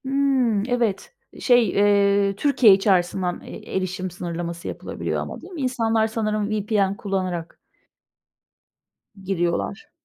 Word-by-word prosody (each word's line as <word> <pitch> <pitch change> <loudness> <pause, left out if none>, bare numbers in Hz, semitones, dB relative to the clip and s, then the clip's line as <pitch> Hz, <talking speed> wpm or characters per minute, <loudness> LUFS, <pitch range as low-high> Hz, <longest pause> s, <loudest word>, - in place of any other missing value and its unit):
Hımm, 265 -6 +1
evet. 235 - -1 0.3
Şey, 245 -3 +4
eee, 200 -1 +3
Türkiye 245 -3 +5
içerisinden, 185 -2 +1
eee, - - -9
erişim 185 0 -3
sınırlaması 170 0 -5
yapılabiliyor - - -4
ama, - - -7
değil 380 - -12
mi? 320 - -5
İnsanlar 225 -4 +1
sanırım 215 -2 -2
VPN 205 -2 0
kullanarak 185 -4 -3 1.6
giriyorlar. 175 +1 -2
200 Hz, 110 wpm, -23 LUFS, 185-225 Hz, 1.6 s, Türkiye